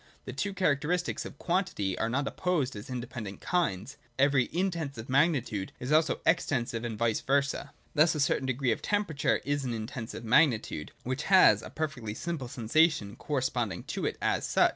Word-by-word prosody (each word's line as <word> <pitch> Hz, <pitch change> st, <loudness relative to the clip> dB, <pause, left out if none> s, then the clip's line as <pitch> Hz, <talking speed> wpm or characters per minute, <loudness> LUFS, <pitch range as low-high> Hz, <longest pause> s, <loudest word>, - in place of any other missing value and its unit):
The 130 Hz, -, -6 dB
two 200 Hz, +9 st, -3 dB
characteristics 175 Hz, +1 st, 0 dB
of -, -, -9 dB
quantity 170 Hz, -, -1 dB
are 115 Hz, -, -1 dB
not 135 Hz, +3 st, 0 dB
opposed 160 Hz, -9 st, -1 dB
as 105 Hz, +3 st, -8 dB
independent 120 Hz, -5 st, -6 dB
kinds. 145 Hz, -, -1 dB, 0.2 s
Every 135 Hz, -2 st, +4 dB
In 185 Hz, +7 st, 0 dB
tensive 140 Hz, -9 st, -5 dB
magnitude 130 Hz, -, +1 dB
is 125 Hz, +3 st, -4 dB
also 155 Hz, +1 st, +3 dB
Extensive, 125 Hz, -8 st, +1 dB
and 115 Hz, -2 st, -4 dB
vice 115 Hz, -1 st, +1 dB
versa. 140 Hz, 0 st, 0 dB, 0.2 s
Thus 155 Hz, +2 st, +4 dB
a -, -, -2 dB
certain 140 Hz, -1 st, +1 dB
degree 130 Hz, -1 st, +1 dB
of -, -, -1 dB
temperature 205 Hz, -8 st, 0 dB
is 145 Hz, 0 st, 0 dB
an 120 Hz, -3 st, -2 dB
Intensive 115 Hz, +1 st, -6 dB
magnitude, 115 Hz, -, +2 dB
which 130 Hz, +4 st, -3 dB
has 185 Hz, -, +7 dB
a -, -, -9 dB
perfectly 130 Hz, -9 st, -4 dB
simple 165 Hz, -5 st, -4 dB
sensation 125 Hz, -2 st, +2 dB
corresponding 125 Hz, -, -2 dB
to -, -, -1 dB
it -, -, -3 dB
as -, -, +1 dB
such. -, -, +4 dB
135 Hz, 170 wpm, -29 LUFS, 115-155 Hz, 0.2 s, has